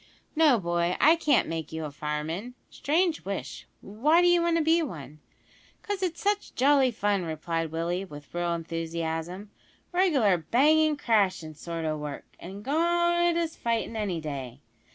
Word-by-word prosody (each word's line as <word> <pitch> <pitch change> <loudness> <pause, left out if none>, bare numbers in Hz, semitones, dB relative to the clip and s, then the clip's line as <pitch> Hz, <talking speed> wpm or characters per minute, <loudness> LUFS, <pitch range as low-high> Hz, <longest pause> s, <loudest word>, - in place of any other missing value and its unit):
"No, 305 -7 +5
boy, 175 -1 0
I 315 +3 +6
can't 300 -5 +2
make 160 -2 -4
you 160 0 -4
a 150 - -6
fireman. 155 +11 -4 0.2
Strange 325 +2 0
wish 195 0 -6
why 295 - +2
d'you 350 -1 +4
want 340 0 +2
to 325 - +1
be 325 +2 +3
one?" 155 - -7 0.6
"'Cause 405 -2 -3
it's 355 -3 -2
such 410 -1 -1
jolly 270 0 +4
fun," 205 -4 0
replied 165 0 -3
Willie; 170 +3 -2
with 145 -6 -12
real 175 0 -1
enthusiasm, 165 +3 -4 0.4
"reg'lar 285 - +3
bangin' 300 - +3
crashin' 195 - +1
sort 165 +2 -5
o' 155 -1 -1
work 150 -1 -6
as 195 +4 -9
good 345 +4 +2
as 330 -1 -2
fightin' 230 -1 -2
any 200 -6 -2
day! 140 -4 -6
200 Hz, 155 wpm, -27 LUFS, -, 0.6 s, I